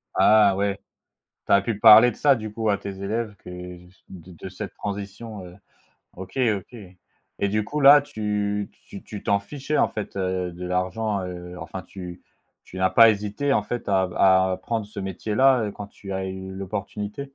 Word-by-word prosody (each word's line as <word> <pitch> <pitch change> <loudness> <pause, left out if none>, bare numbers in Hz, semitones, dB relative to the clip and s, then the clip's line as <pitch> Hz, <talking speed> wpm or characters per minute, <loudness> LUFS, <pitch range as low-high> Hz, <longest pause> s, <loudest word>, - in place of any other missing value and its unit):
Ah 105 -2 +5
ouais. 100 0 -1 0.7
Tu - - -4
as 100 - +6
pu 105 -1 -3
parler 110 +2 +8
de - - -12
ça, 140 -2 +4
du 110 -2 -6
coup, 110 0 -2
à 100 - +2
tes 100 - -7
élèves 110 +1 -3
que - - -12 0.6
de 90 -1 -12
de 95 +3 -9
cette 100 +2 -7
transition 100 0 -6
et 90 0 -12 0.6
OK, 95 +5 -9 0.2
OK, 100 +6 -12 0.6
et 100 - +1
du 105 +1 0
coup 150 +7 -4
là, 145 +1 +8
tu 105 -4 -2 0.2
tu 100 - -9
tu 105 - -9
t'en 100 0 +2
fichais, 140 +8 -4
en - - +4
fait, 105 -2 -6
heu, 95 -2 -2
de 90 +1 -8
l'argent, 95 +3 -1
heu, 90 0 -7
enfin 95 - -7
tu 90 -1 -10 0.4
tu 95 - -11
n'as 95 0 +2
pas 115 +4 +7
hésité, 105 +7 -1
en 105 - +1
fait, 120 0 -5
à 95 -1 +3
v 90 - -11
à 95 -1 +4
prendre 115 -3 -2
ce 105 -1 -9
métier 95 +2 -4
là, 130 -1 +5
heu, 105 - -4
quand 105 0 -8
tu 100 -1 -9
as 95 0 -3
eu 95 0 -6
l'opportunité? 100 +4 -5
100 Hz, 195 wpm, -24 LUFS, 95-110 Hz, 0.7 s, parler